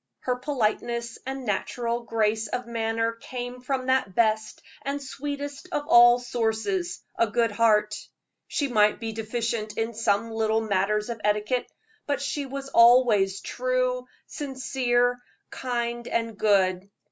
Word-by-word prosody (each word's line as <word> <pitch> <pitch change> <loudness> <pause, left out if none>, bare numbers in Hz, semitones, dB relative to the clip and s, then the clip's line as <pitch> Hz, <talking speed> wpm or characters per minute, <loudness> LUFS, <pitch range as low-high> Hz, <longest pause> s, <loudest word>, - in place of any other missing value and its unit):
Her 250 - 0
politeness 235 -2 -2
and 265 -1 -4
natural 235 +3 -1
grace 220 -1 0
of 250 +3 -3
manner 225 -1 -1
came 245 +2 -7
from 260 0 -2
that 260 -8 +1
best 220 -1 +1 0.2
and 280 +1 -3
sweetest 285 +3 -6
of 295 -2 -2
all 240 -4 +8
sources, 220 -7 -2 0.2
a 230 - +4
good 230 0 +1
heart. 210 -1 +3 0.5
She 285 - -1
might 210 -4 +3
be 225 -1 -4
deficient 225 0 -3
in 225 +1 -1
some 225 0 0
little 220 0 +1
matters 210 +1 0
of 230 -2 -7
etiquette, 210 +4 0 0.4
but 285 -2 0
she 285 0 -3
was 275 +1 -6
always 230 -6 +5
true, 255 0 -1 0.2
sincere, 245 -3 0 0.3
kind 240 -1 -3
and 230 -1 -1
good. 195 -3 +2
235 Hz, 135 wpm, -26 LUFS, 215-255 Hz, 0.5 s, all